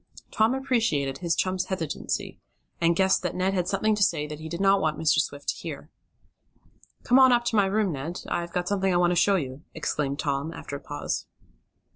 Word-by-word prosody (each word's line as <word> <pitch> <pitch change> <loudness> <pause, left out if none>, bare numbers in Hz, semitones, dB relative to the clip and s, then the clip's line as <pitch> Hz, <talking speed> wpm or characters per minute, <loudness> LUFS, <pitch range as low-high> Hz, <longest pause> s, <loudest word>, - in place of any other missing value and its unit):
Tom 225 +4 +2
appreciated 225 - 0
his 170 -2 0
chum's 185 0 0
hesitancy, 170 -6 -3 0.4
and 170 0 +3
guessed 190 +1 +3
that 180 -2 -3
Ned 185 +1 0
had 180 -2 0
something 210 +3 +1
to 210 - -2
say 150 -6 +2
that 150 0 -7
he 160 0 -7
did 170 +2 -5
not 195 0 +4
want 155 -2 0
Mr. 155 -2 +3
Swift 145 0 -5
to - - 0
hear. - - -8 1.1
"Come 250 +2 +5
on 260 -1 +7
up 240 -1 +3
to 235 - 0
my 200 -2 +4
room, 205 -1 +1
Ned. 155 +5 -5
I've 170 0 -2
got 180 0 -2
something 195 -1 +1
I 175 - +2
want 175 0 +3
to - - +1
show 200 +3 +4
you," 135 -5 -3
exclaimed 145 -3 -2
Tom, 140 +1 -2
after 140 - -7
a - - -5
pause. 145 0 -4
180 Hz, 210 wpm, -26 LUFS, 150-200 Hz, 1.1 s, on